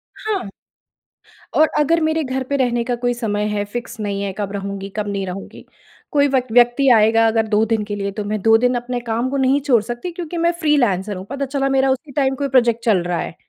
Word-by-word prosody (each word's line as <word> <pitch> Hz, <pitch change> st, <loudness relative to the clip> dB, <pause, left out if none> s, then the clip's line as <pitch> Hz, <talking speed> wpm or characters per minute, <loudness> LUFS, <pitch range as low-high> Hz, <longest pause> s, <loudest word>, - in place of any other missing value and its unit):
हाँ। 405 Hz, -, -3 dB, 1.1 s
और 310 Hz, 0 st, +5 dB
अगर 330 Hz, +3 st, +2 dB
मेरे 315 Hz, 0 st, +1 dB
घर 260 Hz, 0 st, -2 dB
पे 280 Hz, +2 st, -3 dB
रहने 240 Hz, -2 st, +1 dB
का 245 Hz, 0 st, -1 dB
कोई 245 Hz, 0 st, -1 dB
समय 210 Hz, -3 st, -2 dB
है, 210 Hz, -1 st, -1 dB
फिक्स 235 Hz, +2 st, -7 dB
नहीं 200 Hz, -2 st, -3 dB
है, 200 Hz, -, -2 dB
कब 200 Hz, -2 st, -3 dB
रहूँगी, 200 Hz, 0 st, -5 dB
कब 210 Hz, -1 st, -2 dB
नहीं 200 Hz, -1 st, -2 dB
रहूँगी। 185 Hz, +1 st, -8 dB, 0.5 s
कोई 285 Hz, -2 st, +3 dB
व्यक 255 Hz, -4 st, 0 dB
व्यक्ति 245 Hz, +3 st, +4 dB
आएगा 225 Hz, +1 st, +4 dB
अगर 225 Hz, 0 st, +1 dB
2 215 Hz, +1 st, +2 dB
दिन 225 Hz, -1 st, 0 dB
के 205 Hz, 0 st, -4 dB
लिए 200 Hz, 0 st, -3 dB
तो 210 Hz, -, -2 dB
मैं 210 Hz, +1 st, -2 dB
2 225 Hz, +1 st, +5 dB
दिन 250 Hz, +2 st, +2 dB
अपने 245 Hz, 0 st, -3 dB
काम 235 Hz, +1 st, -2 dB
को 280 Hz, -, -2 dB
नहीं 265 Hz, +1 st, +3 dB
छोड़ 260 Hz, -5 st, +3 dB
सकती 240 Hz, -, -5 dB
क्योंकि 340 Hz, 0 st, -6 dB
मैं 335 Hz, +1 st, +2 dB
फ्रीलांसर 230 Hz, -, +1 dB
हूँ। 185 Hz, +1 st, -7 dB
पता 275 Hz, 0 st, -3 dB
चला 275 Hz, 0 st, -1 dB
मेरा 270 Hz, 0 st, +2 dB
उसी 275 Hz, +3 st, -3 dB
टाइम 270 Hz, -1 st, +1 dB
कोई 280 Hz, +1 st, -2 dB
प्रोजेक्ट 235 Hz, -3 st, +2 dB
चल 215 Hz, -4 st, +4 dB
रहा 175 Hz, -1 st, -2 dB
है। -, -, -5 dB
240 Hz, 230 wpm, -19 LUFS, 210-275 Hz, 1.1 s, और